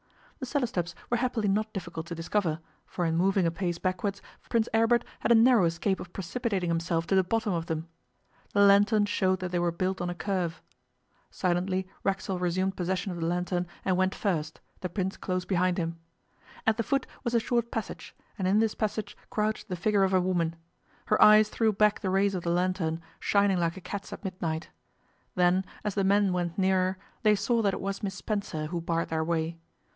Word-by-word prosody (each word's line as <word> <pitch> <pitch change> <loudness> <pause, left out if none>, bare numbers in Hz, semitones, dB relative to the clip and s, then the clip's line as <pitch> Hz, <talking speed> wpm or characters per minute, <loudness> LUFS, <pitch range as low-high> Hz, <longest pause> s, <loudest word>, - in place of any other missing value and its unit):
The 260 - -5
cellar 280 0 +1
steps 175 -7 -3 0.2
were 240 - +3
happily 235 -3 0
not 215 +2 +1
difficult 170 -4 -6
to 170 - -5
discover, 165 -1 -1 0.3
for 175 - -2
in 165 0 +1
moving 190 +2 +3
a 165 - +2
pace 175 0 -2
backwards 185 +2 -2 0.3
Prince 230 -1 +2
Aribert 230 +2 +4 0.2
had - - +1
a - - +8
narrow 230 -3 +6
escape 170 +4 0
of 175 - -8
precipitating 195 -1 -2
himself 165 0 0
to 180 - -1
the 190 - +5
bottom 220 +1 0
of 165 -1 -2
them. 160 0 -3 0.7
The 200 - +5
lantern 205 +1 +5
showed 190 -2 +1
that 185 -1 -3
they 175 - +1
were 175 0 +1
built 185 +2 -2
on 175 - -1
a 175 - -4
curve. 180 -3 -2 0.7
Silently 185 +1 -1 0.2
Racksole 195 -1 -1
resumed 185 +2 0
possession 185 +2 -2
of 175 - -5
the 165 - -1
lantern 180 +1 -1 0.2
and 185 - +2
went 185 +1 +1
first, 160 -6 -2 0.2
the 180 - -4
Prince 190 +1 -2
close 185 -1 -2
behind 180 -1 +1
him. 165 -1 -2 0.7
At 220 0 +3
the - - +1
foot 275 +4 0 0.2
was 235 -2 -1
a - - +5
short 235 0 0
passage, 225 -2 -5 0.2
and 185 - 0
in 195 +2 +3
this 220 0 +2
passage 215 -1 -3
crouched 215 0 -1
the 185 - -3
figure 200 +3 +2
of 190 0 +2
a - - +5
woman. 175 -3 0 0.5
Her 215 - +2
eyes 215 0 +8
threw 225 -1 +2
back 210 0 +3
the 195 - -2
rays 195 +1 +2
of 185 - -2
the 170 - -2
lantern, 175 -2 0 0.2
shining 200 -2 +2
like 170 +1 0
a - - -8
cat's 200 +2 -6
at - - -8
midnight. 170 -4 -3 0.7
Then, 180 +1 +3 0.2
as 210 - -1
the 195 - 0
men 200 0 +3
went 175 -2 -2
nearer, 190 -1 +2 0.2
they 215 -1 +5
saw 230 +3 +1
that 200 -3 +1
it - - -6
was 195 0 -3
Miss 195 -2 -3
Spencer 190 -6 -3
who 170 +2 -3
barred 165 0 -1
their 160 0 0
way. 165 0 -1
190 Hz, 205 wpm, -28 LUFS, 175-205 Hz, 0.7 s, a